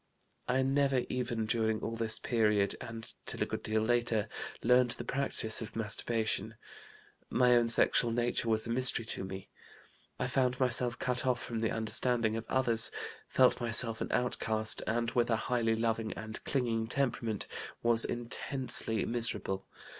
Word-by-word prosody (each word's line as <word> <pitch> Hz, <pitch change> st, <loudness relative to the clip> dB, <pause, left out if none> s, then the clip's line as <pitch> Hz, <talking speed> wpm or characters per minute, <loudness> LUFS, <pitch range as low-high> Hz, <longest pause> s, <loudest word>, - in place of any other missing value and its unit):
I 130 Hz, +1 st, +1 dB
never 135 Hz, -1 st, +1 dB
even, 120 Hz, -3 st, -2 dB
during 110 Hz, -1 st, 0 dB
all 115 Hz, -, -4 dB
this 115 Hz, -1 st, 0 dB
period, 105 Hz, -4 st, +1 dB
and 115 Hz, 0 st, -8 dB
till -, -, 0 dB
a -, -, -1 dB
good -, -, -5 dB
deal 110 Hz, 0 st, 0 dB
later, 115 Hz, -2 st, 0 dB, 0.3 s
learned 125 Hz, +1 st, +4 dB
the -, -, -5 dB
practice 130 Hz, -5 st, +1 dB
of 115 Hz, 0 st, -7 dB
masturbation. 110 Hz, 0 st, -1 dB, 0.7 s
My 125 Hz, -1 st, +4 dB
own 120 Hz, -1 st, +3 dB
sexual 115 Hz, +1 st, +4 dB
nature 120 Hz, 0 st, 0 dB
was 110 Hz, -1 st, +2 dB
a 115 Hz, -, -3 dB
mystery 125 Hz, -2 st, +4 dB
to 110 Hz, -, -3 dB
me. 95 Hz, 0 st, -8 dB, 0.7 s
I -, -, -2 dB
found 125 Hz, -1 st, 0 dB
myself 125 Hz, -2 st, 0 dB
cut 125 Hz, -1 st, -2 dB
off 125 Hz, -1 st, +1 dB
from 120 Hz, -2 st, -4 dB
the 110 Hz, 0 st, 0 dB
understanding 115 Hz, 0 st, +1 dB
of 115 Hz, 0 st, -5 dB
others, 120 Hz, -4 st, +3 dB, 0.4 s
felt 130 Hz, -1 st, +3 dB
myself 115 Hz, -1 st, 0 dB
an -, -, -3 dB
outcast, 110 Hz, -3 st, 0 dB
and, 115 Hz, +1 st, -1 dB
with 120 Hz, -2 st, +1 dB
a 115 Hz, -, +3 dB
highly 115 Hz, 0 st, 0 dB
loving 115 Hz, -1 st, -1 dB
and 110 Hz, 0 st, -7 dB
clinging 115 Hz, -4 st, 0 dB
temperament, 115 Hz, -5 st, -1 dB, 0.4 s
was 115 Hz, -1 st, +5 dB
intensely 120 Hz, -1 st, -1 dB
miserable. 115 Hz, -5 st, -1 dB
115 Hz, 155 wpm, -31 LUFS, 110-125 Hz, 0.7 s, was